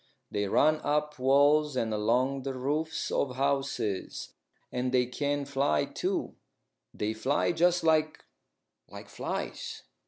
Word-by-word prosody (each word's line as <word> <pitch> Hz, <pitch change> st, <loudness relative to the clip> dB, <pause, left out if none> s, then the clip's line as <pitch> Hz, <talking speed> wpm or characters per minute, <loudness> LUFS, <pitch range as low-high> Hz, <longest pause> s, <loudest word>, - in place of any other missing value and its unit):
They 100 Hz, 0 st, -1 dB
run 155 Hz, +9 st, +4 dB
up 150 Hz, 0 st, 0 dB
walls 145 Hz, +2 st, +4 dB
and 115 Hz, -3 st, 0 dB
along 125 Hz, +6 st, +1 dB
the 135 Hz, 0 st, -4 dB
roofs 150 Hz, +5 st, -2 dB
of 130 Hz, -3 st, 0 dB
houses. 135 Hz, -7 st, -2 dB, 0.4 s
And 125 Hz, 0 st, -1 dB
they 125 Hz, -1 st, +3 dB
can 145 Hz, +3 st, -2 dB
fly, 135 Hz, -, +1 dB
too. -, -, -2 dB, 0.6 s
They 105 Hz, +1 st, -2 dB
fly 130 Hz, +6 st, +1 dB
just 175 Hz, +1 st, +2 dB
like 155 Hz, -1 st, +2 dB, 0.6 s
like -, -, -11 dB
flies." -, -, -5 dB
140 Hz, 125 wpm, -29 LUFS, 125-150 Hz, 0.6 s, run